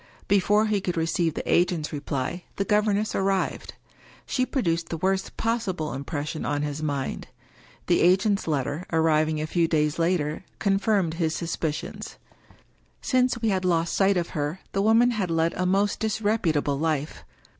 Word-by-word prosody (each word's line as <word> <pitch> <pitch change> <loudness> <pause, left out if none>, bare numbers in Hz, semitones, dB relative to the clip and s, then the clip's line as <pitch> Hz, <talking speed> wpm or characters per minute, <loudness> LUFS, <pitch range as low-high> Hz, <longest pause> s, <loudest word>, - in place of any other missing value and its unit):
Before 205 +2 +3
he 210 -2 0
could 180 -2 -2
receive 165 0 0
the - - -5
agent's 170 -3 +1
reply 145 +3 -3
the 195 - -1
governess 210 0 +1
arrived. 195 -1 -1 0.5
She 255 -1 0
produced 170 -10 -1
the 165 - -3
worst 190 +3 -1
possible 205 -9 -1
impression 145 +3 -4
on 145 0 -1
his 145 0 -3
mind. 140 -3 -3 0.6
The 175 - +2
agent's 190 +3 +3
letter, 145 +3 -2
arriving 155 -1 +2
a 155 - -1
few 165 +1 +1
days 150 -1 +1
later, 165 -2 0
con 195 -2 +1
firmed 200 -7 +1
his 160 -1 0
suspicions. 165 -2 -4 0.9
Since, 255 -2 +2
we 225 - +3
had 190 -2 0
lost 170 -2 +1
sight 195 -1 +3
of 175 -1 -1
her, 150 +4 -3
the 195 - 0
woman 225 +4 +4
had 205 -6 -2
led 165 0 +1
a 180 - -1
most 200 +2 +1
disreputable 205 -10 0
life. 155 -2 -2
175 Hz, 155 wpm, -25 LUFS, 155-200 Hz, 0.9 s, woman